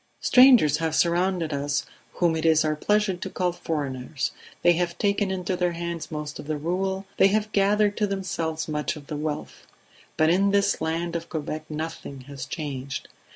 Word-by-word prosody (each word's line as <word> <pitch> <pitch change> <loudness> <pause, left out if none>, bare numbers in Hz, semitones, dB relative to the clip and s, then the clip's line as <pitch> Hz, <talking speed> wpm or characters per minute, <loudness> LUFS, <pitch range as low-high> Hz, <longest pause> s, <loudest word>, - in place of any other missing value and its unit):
"Strangers 250 - +6
have 160 -1 -1
surrounded 175 -2 +1
us 145 0 -1 0.3
whom 170 -2 +2
it 160 - -2
is 160 -1 +4
our 155 0 +1
pleasure 210 +5 +1
to 175 - -6
call 180 -1 0
foreigners; 140 -5 -3 0.3
they 175 - +6
have 170 0 -1
taken 200 -1 +1
into 185 -1 -2
their 180 -1 0
hands 170 -1 -4
most 150 -1 -5
of - - -8
the 155 -1 -1
rule, 190 +5 -2
they - - +6
have 215 +2 0
gathered 205 +1 +3
to 210 - +1
themselves 165 -5 -3
much 150 0 -2
of 150 -2 -11
the 150 - -5
wealth; 145 - -5 0.5
but 155 +1 +4
in 195 +3 +3
this 200 0 +2
land 165 +1 -2
of 170 0 -4
Quebec 155 -1 -4
nothing 155 -3 -6
has 135 0 -8
changed. 140 -3 -5
165 Hz, 180 wpm, -25 LUFS, 150-190 Hz, 0.5 s, Strangers